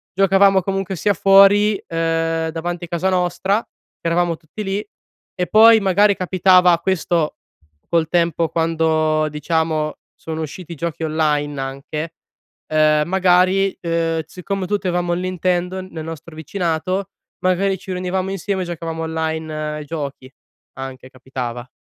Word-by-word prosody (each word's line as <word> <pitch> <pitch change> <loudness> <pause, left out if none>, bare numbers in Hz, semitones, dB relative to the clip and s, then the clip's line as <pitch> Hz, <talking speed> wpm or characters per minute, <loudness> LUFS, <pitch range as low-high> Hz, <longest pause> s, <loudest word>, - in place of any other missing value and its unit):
giocavamo 195 0 +4
comunque 195 0 -2
sia 205 +4 +1
fuori, 200 +2 +5
ehm, 165 0 0
davanti 175 +1 -4
casa 170 +3 -1
nostra 190 +3 +1
che - - -11
eravamo 170 -1 +1
tutti 165 +7 -8
lì, 195 - -3 0.5
e 180 -1 -1
poi 225 +1 +7
magari 200 +1 +3
capitava 180 -1 +4
questo 170 -3 0 0.5
col 165 -2 +2
tempo 170 -2 +1
quando 160 -1 +1
diciamo 155 0 -1 0.2
sono 160 0 -6
usciti 170 +3 -7
i - - -9
giochi 165 +1 -4
online 150 -2 0
anche, 145 +4 -5 0.5
ehm, 155 -1 +3
magari, 185 +1 +3
ehm, 165 -1 -1
siccome 185 +1 -4
tutti 205 -2 -1
avevamo 175 -1 0
il 175 - -1
Nintendo 185 0 -1
nel 170 -4 -8
nostro 165 0 -8
vicinato, 175 +3 -2 0.3
magari 190 +1 +1
ci 190 - -9
riunivamo 185 +1 -2
insieme 195 0 -2
giocavamo 165 -1 -5
online 160 -1 -3 0.2
ai 150 - -7
giochi, 140 -4 -6 0.4
anche 130 -1 -8
capitava. 125 -2 -6
170 Hz, 130 wpm, -20 LUFS, 160-185 Hz, 0.5 s, poi